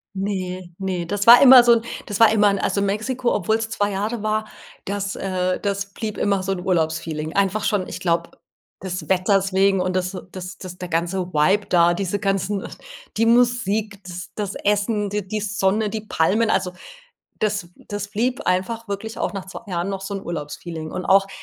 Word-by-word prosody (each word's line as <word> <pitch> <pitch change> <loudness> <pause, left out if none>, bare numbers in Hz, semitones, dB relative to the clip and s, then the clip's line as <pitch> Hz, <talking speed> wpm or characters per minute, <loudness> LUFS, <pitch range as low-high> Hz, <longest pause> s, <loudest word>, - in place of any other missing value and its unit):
Ne, 185 -2 -4
ne. 185 -3 -2
Das 200 +4 -2
war 240 +1 +10
immer 260 -2 +10
so 240 0 +6
'n 230 - +2 0.3
das 205 -2 -3
war 225 -2 +7
immer 210 -2 +4
'n 200 - 0
also, 200 - 0
Mexiko, 220 +5 0
obwohl 215 +3 +1
es 225 0 -4
2 205 -2 0
Jahre 210 +3 -2
war, 215 0 0 0.4
das 200 0 -3
äh, 185 -1 -1
das 200 -1 -3
blieb 215 -1 -5
immer 200 -2 +1
so 190 +1 -2
'n 180 -1 -6
Urlaubsfeeling. 160 -3 -1
Einfach 200 +1 +1
schon, 200 -3 0
ich - - -6
glaube, 170 -2 0 0.5
des 185 -3 -5
Wetters 190 +1 +2
wegen. 195 0 +3
Und 185 0 -1
das 185 +1 -1
das 185 +1 -7
das 180 -1 -9
der 180 - -5
ganze 175 +2 -1
Vibe 185 +5 +2
da, 175 -1 +4
diese 190 +2 -2
ganzen 195 0 -1
äh, - - -7 0.5
die 225 +1 +3
Musik, 220 -4 +2
das 180 0 -8
das 205 -2 -3
Essen, 205 0 0
d 210 0 -1
die 210 +2 -4
Sonne, 210 +1 0
die 220 - -3
Palmen. 215 +3 +1
Also, 185 -3 0 0.7
das 205 -4 -1
das 205 -1 -6
blieb 245 +5 -1
einfach 220 +6 -1
wirklich 200 +3 -5
auch - - -1
nach 195 -2 -5
2 190 - -9
Jahren 175 0 -2
noch 195 -1 -4
so 195 +1 -4
'n 195 - -5
Urlaubsfeeling. 160 0 -6
Und 185 0 -4
auch 195 0 +4
195 Hz, 195 wpm, -22 LUFS, 185-210 Hz, 0.7 s, war